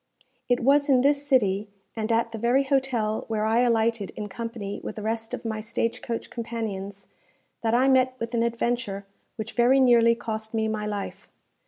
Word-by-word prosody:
It 245 Hz, -, +2 dB
was 285 Hz, +3 st, +3 dB
in 260 Hz, -2 st, +5 dB
this 285 Hz, +1 st, +2 dB
city, 210 Hz, -6 st, +2 dB, 0.3 s
and 220 Hz, 0 st, -2 dB
at 230 Hz, 0 st, +1 dB
the 225 Hz, -, -6 dB
very 245 Hz, +5 st, +3 dB
hotel 260 Hz, -6 st, 0 dB
where 215 Hz, -1 st, -1 dB
I 225 Hz, +2 st, +3 dB
alighted 230 Hz, -3 st, +2 dB
in 210 Hz, -1 st, -5 dB
company 230 Hz, -2 st, -5 dB
with -, -, -5 dB
the 215 Hz, -, -6 dB
rest 225 Hz, +1 st, -3 dB
of -, -, -5 dB
my 220 Hz, -1 st, -2 dB
stage 230 Hz, +2 st, -2 dB
coach 230 Hz, -2 st, -5 dB
companions, 205 Hz, -4 st, -5 dB, 0.6 s
that 225 Hz, 0 st, +1 dB
I 255 Hz, +2 st, +4 dB
met 255 Hz, -1 st, +3 dB
with 230 Hz, 0 st, -5 dB
an 230 Hz, -, +1 dB
adventure 235 Hz, -3 st, -1 dB, 0.3 s
which 220 Hz, -1 st, -6 dB
very 250 Hz, +3 st, +4 dB
nearly 235 Hz, -2 st, +5 dB
cost 220 Hz, -1 st, -5 dB
me 220 Hz, 0 st, +1 dB
my 215 Hz, -1 st, -2 dB
life. 205 Hz, -1 st, -5 dB
230 Hz, 185 wpm, -26 LUFS, 215-245 Hz, 0.6 s, in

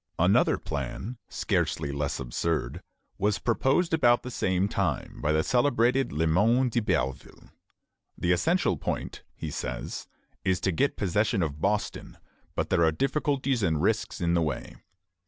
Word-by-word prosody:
" -, -, -47 dB
Another -, -, +4 dB
plan, 120 Hz, +4 st, -5 dB
scarcely 75 Hz, -3 st, -1 dB
less 70 Hz, 0 st, -2 dB
absurd, 65 Hz, +1 st, -2 dB, 0.4 s
was 105 Hz, +1 st, +2 dB
proposed 135 Hz, +8 st, +1 dB
about 120 Hz, -6 st, +4 dB
the 125 Hz, -, -6 dB
same 95 Hz, -3 st, +1 dB
time -, -, -2 dB
by 75 Hz, -, +1 dB
the 80 Hz, 0 st, +2 dB
celebrated 125 Hz, 0 st, +2 dB
Le 80 Hz, +3 st, 0 dB
Moyne 115 Hz, +10 st, +3 dB
d'Iberville. 105 Hz, -, -2 dB, 0.7 s
The 85 Hz, -, +1 dB
essential 120 Hz, -, +2 dB
point, -, -, -4 dB
he 80 Hz, -, -5 dB
says, -, -, -5 dB, 0.4 s
is 95 Hz, -1 st, +1 dB
to 95 Hz, -, +1 dB
get 140 Hz, -, 0 dB
possession 100 Hz, +1 st, +1 dB
of 75 Hz, -1 st, -4 dB
Boston; 105 Hz, +4 st, -1 dB, 0.4 s
but -, -, -2 dB
there 85 Hz, -, +4 dB
are 80 Hz, -, +4 dB
difficulties 135 Hz, -, 0 dB
and 80 Hz, -6 st, +1 dB
risks 110 Hz, +7 st, 0 dB
in 85 Hz, -1 st, +1 dB
the 85 Hz, -, +3 dB
way. 75 Hz, -4 st, -3 dB
100 Hz, 150 wpm, -27 LUFS, 80-125 Hz, 0.7 s, Another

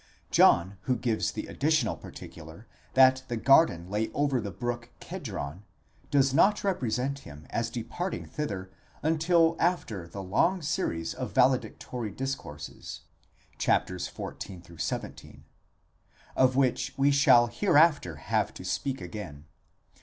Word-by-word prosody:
John, 95 Hz, +3 st, +4 dB
who 130 Hz, -, +2 dB
gives 115 Hz, -1 st, 0 dB
the -, -, -5 dB
addi -, -, -11 dB
tional 155 Hz, 0 st, +1 dB
particular 80 Hz, +6 st, -11 dB, 0.3 s
that 130 Hz, 0 st, +6 dB
the 120 Hz, -, -3 dB
garden 110 Hz, -, +4 dB
lay 105 Hz, +3 st, -1 dB
over 140 Hz, -4 st, +1 dB
the 100 Hz, -, -4 dB
brook 120 Hz, +4 st, -4 dB
Kedron, 70 Hz, +6 st, -6 dB, 0.5 s
does 135 Hz, -2 st, +3 dB
not 200 Hz, +8 st, +5 dB
repre 175 Hz, -, -1 dB
sent 135 Hz, +4 st, -1 dB
him 75 Hz, -, -12 dB
as 115 Hz, 0 st, -1 dB
departing 125 Hz, +11 st, -4 dB
thither 100 Hz, -11 st, -5 dB, 0.3 s
until 165 Hz, +1 st, +3 dB
after 115 Hz, -, -1 dB
a 100 Hz, -, -7 dB
long 135 Hz, -, +1 dB
series 145 Hz, -, -2 dB
of -, -, -5 dB
valedictory 120 Hz, -4 st, +1 dB
discourses 100 Hz, -, -6 dB, 0.6 s
(xiv.—xvii.), 90 Hz, -1 st, -3 dB, 0.9 s
of 130 Hz, -1 st, +4 dB
which 135 Hz, 0 st, +1 dB
we 140 Hz, +1 st, +4 dB
shall 135 Hz, -4 st, +6 dB
hereafter 145 Hz, -, +3 dB
have 75 Hz, -, -1 dB
to -, -, -9 dB
speak 135 Hz, -6 st, -2 dB
again. 85 Hz, -5 st, -8 dB
120 Hz, 125 wpm, -28 LUFS, 95-145 Hz, 0.9 s, that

